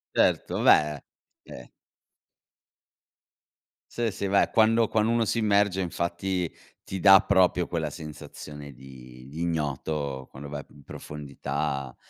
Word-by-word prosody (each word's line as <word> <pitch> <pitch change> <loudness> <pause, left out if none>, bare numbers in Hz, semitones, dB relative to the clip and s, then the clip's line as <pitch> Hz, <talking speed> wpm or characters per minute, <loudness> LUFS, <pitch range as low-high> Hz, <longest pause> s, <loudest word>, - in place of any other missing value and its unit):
Certo, - - +1
beh, 75 -1 +4 0.5
eh - - -11 2.2
Sì, 120 -1 -1
sì. 100 0 -4
Beh 100 +1 +3
quando 115 0 +4
quando 110 +1 +1
uno 115 -1 +2
si 115 - -1
immerge 100 -3 +2
infatti 85 +1 -2 0.3
ti 95 - -5
da 95 0 +8
proprio 90 -3 +3
quella 80 -3 -2
sensazione 75 -1 -9
di 65 -1 -13
di 80 - -7
ignoto, 75 -4 -2
quando 70 +1 -10
vai 70 -1 -5
p - - -26
in 70 - -17
profondità, 70 -2 -5
80 Hz, 125 wpm, -26 LUFS, 70-95 Hz, 2.2 s, da